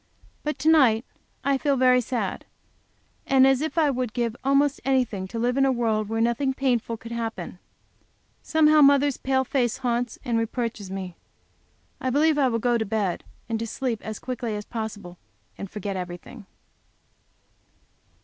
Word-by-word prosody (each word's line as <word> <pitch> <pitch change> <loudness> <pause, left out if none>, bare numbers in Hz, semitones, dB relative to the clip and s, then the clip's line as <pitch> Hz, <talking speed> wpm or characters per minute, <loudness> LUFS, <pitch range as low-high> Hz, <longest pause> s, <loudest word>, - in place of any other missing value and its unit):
But 300 -1 -2
to 285 +3 -3
night 260 -8 +5 0.4
I 275 -1 +1
feel 285 -1 +1
very 255 0 +5
sad, 245 0 -3 0.8
and 265 -1 +5
as 270 0 +3
if 315 +2 -3
I 305 -3 +4
would 250 -3 -3
give 235 -2 -1
almost 275 +1 +2
any 265 -1 +3
thing 195 -4 -6
to 230 - -7
live 245 +3 0
in 275 - +4
a 270 - +3
world 220 -4 0
where 225 0 -1
nothing 235 +4 +1
painful 240 -4 0
could 230 +1 -10
happen. 225 -6 -5 0.8
Somehow 310 -1 +4
mother's 280 -1 +5
pale 265 0 +1
face 245 -3 0
haunts 245 -2 -1
and 235 -3 +1
reproaches 225 -3 -3
me. 190 -2 -6 0.8
I 260 - -1
believe 295 +3 +3
I 270 - +4
will 230 -2 0
go 240 +1 +1
to - - +1
bed 205 -4 -2 0.2
and 225 -1 -2
to 230 - -3
sleep 235 -1 -3
as 220 -1 -6
quickly 240 -4 -4
as 210 0 -5
possible, 210 -6 -6 0.4
and 200 - -7
forget 200 -1 -5
everything. 180 +4 -8
240 Hz, 170 wpm, -25 LUFS, 220-270 Hz, 0.8 s, night